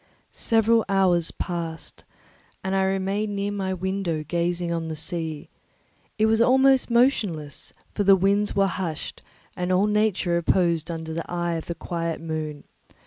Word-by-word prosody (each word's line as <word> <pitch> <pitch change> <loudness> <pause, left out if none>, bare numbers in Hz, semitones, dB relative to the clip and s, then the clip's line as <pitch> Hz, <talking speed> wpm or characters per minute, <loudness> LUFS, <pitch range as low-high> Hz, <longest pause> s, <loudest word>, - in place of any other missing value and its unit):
Several 225 0 +2
hours 185 -4 +3
passed, 165 -2 -5 0.6
and 190 0 -2
I 190 0 +2
remained 195 +2 -1
near 200 +1 -1
my 195 -2 -2
window 185 -3 -2
gazing 175 +1 -1
on 165 -1 -2
the 160 - -4
sea; 160 -1 -5 0.7
it 215 - +3
was 220 +1 +3
almost 265 +2 +4
motionless, 205 - +1 0.2
for 205 - 0
the 195 0 +7
winds 200 +2 +1
were 195 -1 +4
hushed, 175 -5 -4 0.3
and 180 0 -2
all 185 +2 +4
nature 210 -4 +1
reposed 170 -1 +1
under 160 -1 -5
the 165 +1 -5
eye 175 -1 -1
of 165 -1 -4
the 170 - -3
quiet 165 -2 -3
moon. 155 -2 -4
180 Hz, 150 wpm, -25 LUFS, 165-200 Hz, 0.7 s, the